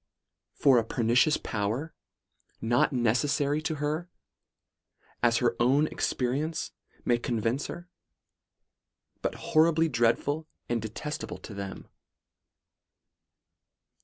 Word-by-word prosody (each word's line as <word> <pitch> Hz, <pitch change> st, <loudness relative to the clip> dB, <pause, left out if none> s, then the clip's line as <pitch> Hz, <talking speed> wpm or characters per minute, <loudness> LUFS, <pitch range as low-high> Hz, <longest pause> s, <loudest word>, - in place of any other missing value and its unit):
for 135 Hz, -4 st, +5 dB
a -, -, 0 dB
pernicious 120 Hz, +6 st, +3 dB
power, 110 Hz, +9 st, -3 dB, 0.7 s
not 120 Hz, +5 st, +2 dB
necessary 140 Hz, +4 st, +1 dB
to 160 Hz, 0 st, -2 dB
her 155 Hz, +4 st, -2 dB, 1.1 s
as 120 Hz, -1 st, +4 dB
her 120 Hz, -2 st, +2 dB
own 135 Hz, +5 st, +4 dB
experience 145 Hz, +3 st, -1 dB, 0.3 s
may 120 Hz, -1 st, +3 dB
convince 120 Hz, +3 st, -1 dB
her; 175 Hz, 0 st, -8 dB, 1.3 s
but -, -, -2 dB
horribly 160 Hz, +1 st, +3 dB
dread 120 Hz, -4 st, +3 dB
ful 150 Hz, +2 st, -3 dB, 0.2 s
and 120 Hz, -1 st, -1 dB
detestable 110 Hz, +8 st, -5 dB
to 110 Hz, -, -10 dB
her. 100 Hz, -1 st, -6 dB
125 Hz, 100 wpm, -28 LUFS, 115-150 Hz, 1.3 s, for